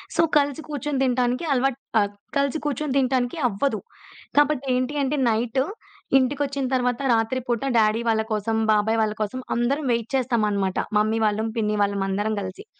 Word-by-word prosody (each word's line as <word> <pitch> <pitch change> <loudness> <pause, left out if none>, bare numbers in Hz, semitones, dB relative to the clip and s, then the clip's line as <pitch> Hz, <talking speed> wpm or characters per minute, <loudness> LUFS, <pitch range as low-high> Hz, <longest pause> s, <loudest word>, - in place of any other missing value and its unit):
So, 330 - +4 0.2
కలిసి 285 0 +1
కూర్చొని 290 -1 -2
తినటానికి 250 +3 +1
అలవాట్ 270 0 +1 0.2
ఆహ్, 205 0 -1 0.3
కలిసి 280 +2 +1
కూర్చొని 290 -1 -1
తినటానికి 255 +1 +1
అవ్వదు. 220 +2 -1 0.6
కాబట్టి 290 -2 +3
ఏంటి 255 +3 -1
అంటే 280 +2 0
నైటు 235 +4 +1 0.5
ఇంటికొచ్చిన 275 +1 0
తర్వాత 250 0 +1
రాత్రి 225 +3 +1
పూట 240 -1 -1
డ్యాడీ 220 +1 +3
వాళ్ళ 220 -1 +2
కోసం, 215 +1 -1 0.2
బాబాయి 215 +1 +2
వాళ్ళ 215 -1 +1
కోసం 215 +5 -2 0.2
అందరం 270 +6 0
వెయిట్ 235 -1 -1
చేస్తామనమాట. 210 -7 0 0.2
మమ్మీ 215 +2 +2
వాళ్ళం, 215 +1 0
పిన్ని 210 -1 0
వాళ్ళం 200 -1 0
అందరం 205 +3 -1
గలిసి. 185 - -7
245 Hz, 155 wpm, -24 LUFS, 215-270 Hz, 0.6 s, So